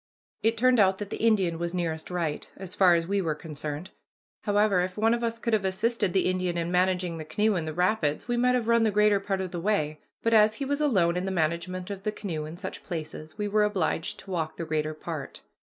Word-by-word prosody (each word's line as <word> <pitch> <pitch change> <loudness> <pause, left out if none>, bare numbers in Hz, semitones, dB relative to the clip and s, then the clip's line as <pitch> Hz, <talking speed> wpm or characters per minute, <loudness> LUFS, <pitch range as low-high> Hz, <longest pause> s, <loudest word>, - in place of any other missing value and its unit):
It 225 +1 +2
turned 250 +1 +4
out 190 -2 +4
that 205 0 -6
the - - -3
Indian 190 -7 +2
was 170 +1 -2
nearest 160 -3 -2
right, 170 -4 -2
as 190 -2 -7
far 180 -3 +5
as 165 0 0
we 200 +2 0
were 160 -4 -1
concerned. 150 +2 -5 0.5
However, 205 -3 +3
if 180 +1 -3
one 225 +2 +3
of 235 0 -1
us 230 0 -1
could 230 0 -2
have 215 -2 +2
assisted 205 +2 0
the 190 +1 +2
Indian 185 -1 0
in 170 0 -1
managing 180 -2 +1
the - - -4
canoe 210 +6 +1
in 165 -3 -1
the 155 - -3
rapids, 180 -4 +1
we 240 - 0
might 250 +1 +3
have 240 -3 -1
run 235 0 +4
the 225 - +3
greater 210 0 +4
part 195 -1 -2
of 185 -2 -4
the 175 -2 -4
way; 155 -7 0 0.2
but 230 - +2
as 215 0 +5
he 275 - -3
was 285 +2 -1
alone 185 - +3
in 180 - -1
the - - -1
management 180 +2 -1
of 195 -1 -5
the 215 - -1
canoe 170 -8 -4
in 155 +2 -8
such 190 0 -6
places 155 -1 -6
we 210 -1 -1
were 210 +1 +3
obliged 190 -4 -1
to 195 - -11
walk 160 -3 -2
the 170 - -4
greater 155 0 -1
part. 155 -3 -6
185 Hz, 245 wpm, -27 LUFS, 170-210 Hz, 0.5 s, far